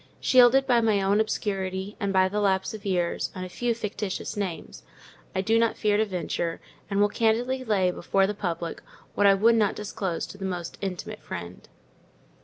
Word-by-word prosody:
Shielded 255 +1 +5
by 245 -3 +3
my 220 -3 +2
own 200 +2 +3
obscurity, 195 -2 -3
and 200 -1 -1
by 190 -1 +4
the 205 +2 -2
lapse 190 -1 +1
of 210 -1 -7
years, 175 -3 0
and 185 0 -4
a - - -8
few 235 +6 -1
fictitious 210 -3 -4
names, 195 -5 -5 0.5
I 190 - +1
do 225 +4 +2
not 230 -1 +1
fear 210 -1 +2
to 220 - +2
venture; 175 -3 -3 0.3
and 200 -1 0
will 205 - +5
candidly 235 +5 0
lay 195 -6 +2
before 195 +2 +1
the 205 - -1
public 170 -4 -4 0.3
what 205 - +3
I 195 - +6
would 225 +4 +4
not 215 -3 +2
disclose 200 -4 -3
to 200 - -12
the - - -6
most 180 -3 -4
intimate 190 -3 -5
friend. 85 +1 -8
200 Hz, 190 wpm, -26 LUFS, 185-220 Hz, 0.5 s, I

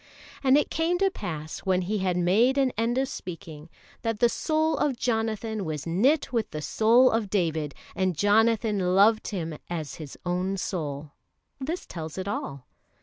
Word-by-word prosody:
"And 265 +1 +6
it 295 - +1
came 330 +2 +1
to 390 +1 +2
pass 155 - -5
when 185 -1 +1
he 210 +4 -1
had 185 -2 0
made 215 +10 +3
an 270 -2 +3
end 230 +3 0
of 265 0 +1
speaking, 165 - -8 0.3
that 225 -2 -2
the 240 0 +5
soul 315 +4 +1
of 275 -4 +1
Jonathan 220 -2 -1
was 155 -4 -4
knit 255 - +2
with 230 -3 0
the 155 - -5
soul 235 - +4
of 225 -3 0
David, 160 -7 -1 0.2
and 185 -4 0
Jonathan 205 -2 +2
loved 215 +3 +4
him 165 -6 -4
as 160 -5 -4
his 150 -4 -9
own 180 +2 -1
soul": 150 -6 -4 0.5
this 315 +7 -4
tells 160 -1 -7
it 190 +1 -4
all. 140 -10 -4
200 Hz, 170 wpm, -26 LUFS, 170-235 Hz, 0.5 s, And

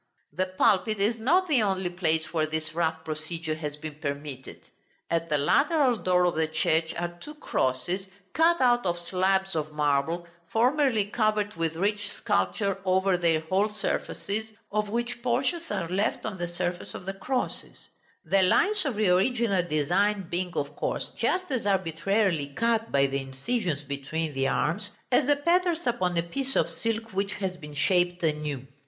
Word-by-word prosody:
The 185 0 0
pulpit 200 +3 +2
is 220 +3 +1
not 350 +11 +3
the 280 -8 +3
only 190 -3 0
place 160 -3 -1
where 155 -2 +1
this 155 0 -3
rough 160 -1 -1
procedure 160 +1 -4
has 150 -2 -4
been 150 -1 -8
permitted: 140 -3 -5 0.5
at 165 0 0
the 150 - +2
lateral 260 - +3
door 180 -2 +2
of 175 - +2
the 160 0 +1
church 160 +1 +1
are 175 0 -4
two 300 +1 -9
crosses, 175 - -1 0.3
cut 335 +1 +4
out 245 -1 +4
of 175 -2 0
slabs 190 +2 +1
of 155 -1 -2
marble, 150 +3 +1 0.3
formerly 250 -2 +3
covered 210 -1 0
with 165 -1 -2
rich 205 +3 -1
sculpture 95 - 0
over 190 0 +3
their 165 -3 +2
whole 190 +6 +1
surfaces, 215 +1 -3 0.2
of 210 0 0
which 240 +2 -2
portions 265 +8 0
are 170 - -2
left 195 +5 -1
on 205 -4 -4
the 175 - -1
surface 175 +1 -4
of 180 - -8
the 195 - -3
crosses; 250 +7 -3 0.4
the 195 - +3
lines 400 - +3
of 270 -6 -1
the 210 -2 +2
original 200 +1 +2
design 180 +5 +1
being, 180 +1 -1
of 145 +1 -2
course, - - -2
just 365 -3 0
as 245 -6 -1
arbitrarily 190 -2 +1
cut 230 -1 +1
by 140 0 +4
the 135 0 -1
incisions 150 - -2
between 145 +3 -3
the 135 0 +1
arms, 190 +9 0 0.2
as 255 +2 +4
the 290 - +5
patterns 345 +3 +1
upon 185 -8 0
a 170 - +2
piece 270 +10 -2
of 170 - +2
silk 225 +6 -3
which 195 +1 -1
has 190 -3 -3
been 150 -4 -10
shaped 175 +2 +2
anew. 150 -4 -1
185 Hz, 170 wpm, -27 LUFS, 160-220 Hz, 0.5 s, the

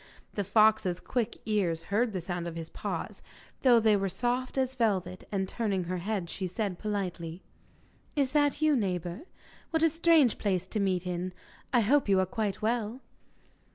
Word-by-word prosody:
The 205 - -1
fox's 215 -3 +3
quick 235 -3 -2
ears 180 -7 0
heard 230 +2 +2
the 185 -3 -3
sound 175 0 -4
of 170 - -6
his 165 -1 -6
paws, - - -5 0.4
though 245 -3 +6
they 220 -1 +4
were 195 -1 0
soft 245 +7 -1
as 260 -1 +1
velvet, 190 -7 -1
and 195 -2 0
turning 200 -5 -1
her 180 +1 -3
head 195 -1 -2
she 185 +2 -4
said 185 0 -3
politely: 180 -5 -3 0.7
'Is 275 -3 +1
that 290 +1 +2
you, 305 -1 +5
neighbour? 185 - -2 0.4
What 320 -1 +1
a 330 - +6
strange 325 -6 +4
place 185 -3 0
to 210 +3 -3
meet 185 -2 0
in! 180 +1 -3 0.4
I 245 - +4
hope 260 +2 +3
you 195 -1 +5
are 190 - +3
quite 210 0 -3
well? 230 +2 -1
205 Hz, 175 wpm, -29 LUFS, 185-240 Hz, 0.7 s, though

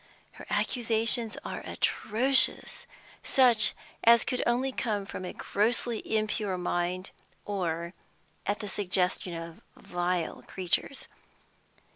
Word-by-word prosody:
Her - - -12
accusations 230 -1 +1
are - - -4
atrocious, 255 +5 +1 0.3
such 235 -5 +5 0.3
as 235 0 +7
could 250 - -1
only 250 +3 +1
come 215 -6 -2
from 185 - -7
a 180 - -4
grossly 230 +2 0 0.2
impure 210 -3 -1
mind, 180 +1 -2 0.3
or 170 -4 -2 0.5
at 205 +2 0
the 210 - -5
suggestion 185 -2 -1
of 165 0 -8
vile 175 -1 -2
creatures. 190 +8 -2
205 Hz, 105 wpm, -29 LUFS, 180-235 Hz, 0.5 s, as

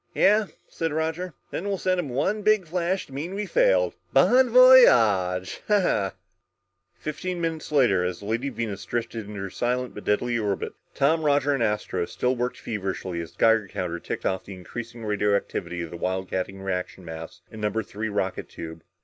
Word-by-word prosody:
"Yeah," 210 +1 +4 0.2
said 165 -1 -3
Roger, 160 +2 -2 0.2
"then 195 - -3
we'll 200 -1 0
send 185 0 0
him 160 -6 -2
one 190 - 0
big 215 -2 +3
flash 175 +3 -1
to 135 - -15
mean 160 +8 -4
we 210 +1 -2
failed! - - +3 0.2
Bon 255 0 +5
voyage!" 115 - +6 1.4
Fifteen 175 +4 -4
minutes 165 -2 -3
later, 120 -11 +4
as 90 -1 -2
the - - -10
Lady 115 +6 -1
Venus 115 -6 -4
drifted 115 -2 -4
in 105 - -8
her 95 -1 -5
silent 125 +4 -1
but 105 - -8
deadly 120 +3 +1
orbit, 100 -3 -2 0.2
Tom, 160 +4 +3
Roger 145 -1 +3
and 135 - -1
Astro 105 -5 0
still 125 +1 0
worked 125 +1 -2
feverishly 95 -4 -3
as 85 - -9
the - - -30
Geiger 115 -2 +4
counter 85 -2 -4
ticked - - -5
off 95 -1 0
the 100 - -9
increasing 115 +5 -8
radioactivity 100 -4 -1
of 85 - -8
the 85 - -7
wildcatting 95 +1 -3
reaction 90 -1 -4
mass 80 0 -8
in 110 - -9
number 105 +1 0
three 110 +2 -4
rocket 100 -2 -2
tube. 80 0 -8
115 Hz, 175 wpm, -25 LUFS, 95-160 Hz, 1.4 s, voyage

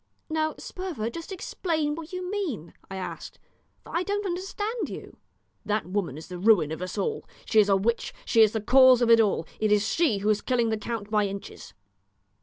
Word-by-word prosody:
"Now, 315 0 0
Sperver, 330 - -5
just 335 +8 -8
explain 320 -5 -2
what 325 +1 -8
you 365 0 -4
mean," 295 - -3 0.2
I 195 - -6
asked, 190 - -6 0.5
"for - - -9
I 340 - +2
don't 405 +2 -2
understand 395 +5 -3
you." - - -9 0.5
"That 210 0 -1
woman 180 -6 -2
is 160 - -9
the 180 -1 -7
ruin 185 -7 +4
of 160 - -5
us 185 0 -5
all. 450 -2 -2 0.2
She 220 - +3
is 205 -1 +5
a 195 - +5
witch. 230 +5 -1
She 230 - +4
is 215 -1 +5
the 220 - -1
cause 255 +2 +6
of 235 - +4
it 230 - +8
all. 200 -6 +1
It 215 -1 +1
is 210 0 +3
she 295 -6 +2
who 205 +2 -1
is 210 -1 +2
killing 240 -3 +1
the 220 - 0
count 215 -1 -5
by 210 -1 +2
inches." 195 - -8
230 Hz, 210 wpm, -26 LUFS, 205-330 Hz, 0.5 s, it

